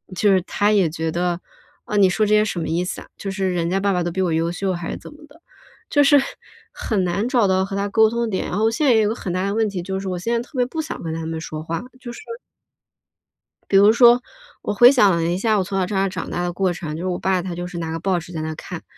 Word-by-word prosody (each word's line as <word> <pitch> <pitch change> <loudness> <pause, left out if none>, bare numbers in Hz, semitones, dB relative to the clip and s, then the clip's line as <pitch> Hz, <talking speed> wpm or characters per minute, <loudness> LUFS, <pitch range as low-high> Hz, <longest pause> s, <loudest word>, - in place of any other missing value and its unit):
就 205 +2 +3
是 185 - +3
他 205 +3 +1
也 195 -6 +3
觉 160 0 -3
得： 175 +1 -1 0.4
“啊， 210 - -2
你 195 -2 +5
说 215 +4 +1
这 210 - +1
些 210 - +4
什 195 -4 -3
么 160 - -3
意 175 +2 0
思 - - -5
啊？ - - -13
就 195 - -5
是 190 -1 -1
人 170 -1 -1
家 190 +2 +1
爸 200 +1 +1
爸 180 -1 0
都 175 - -2
比 190 - -2
我 180 - +1
优 165 +1 +1
秀 190 +1 -2
还 170 -1 -5
是 - - -4
怎 - - -12
么 300 +1 -15
的？” 330 - -20 0.5
就 290 - +4
是， 285 +1 +6 0.6
很 205 -4 -1
难 190 +6 -1
找 235 -6 +3
到 190 0 +2
和 195 - -6
他 200 +1 -1
沟 220 +1 +4
通 235 +1 -2
的 - - -1
点。 190 - -2
然 180 - -3
后 220 +1 +2
现 295 +6 0
在 - - +6
也 220 - +4
有 - - +2
一 210 - +1
个 - - 0
很 190 - -5
大 185 +1 -1
的 200 - -1
问 220 -1 +1
题， 190 -3 -4
就 190 +1 -3
是 195 - -6
我 180 - -3
现 230 +6 -2
在 235 - +1
特 250 +2 -11
别 250 - +3
不 315 +6 -4
想 315 - -6
跟 160 -1 -3
他 165 0 -4
们 165 0 -4
说 155 -1 -6
话， 165 +1 -3 0.2
就 245 -2 -8
是 - - -10 1.5
比 195 - +5
如 200 +2 +7
说， 240 +1 +6 0.4
我 - - -2
回 240 +5 +8
想 210 -8 +5
了 165 - 0
一 175 +2 0
下 215 +1 +1
我 195 - +1
从 195 +1 -4
小 185 - +2
在 - - -8
这 205 - -4
儿 195 0 +1
长 185 -3 -5
大 175 - -2
的 175 0 -2
过 185 0 0
程， 155 -4 -6
就 165 - -5
是 - - -2
我 180 -1 -1
爸 190 -1 +1
他 175 -1 -5
就 175 +1 -5
是 180 -1 -8
拿 165 -1 -4
个 165 - -3
报 185 0 0
纸 170 +1 -11
在 160 - -4
那 155 0 -3
看。 175 +1 -8
190 Hz, 340 characters per minute, -21 LUFS, 175-215 Hz, 1.5 s, 回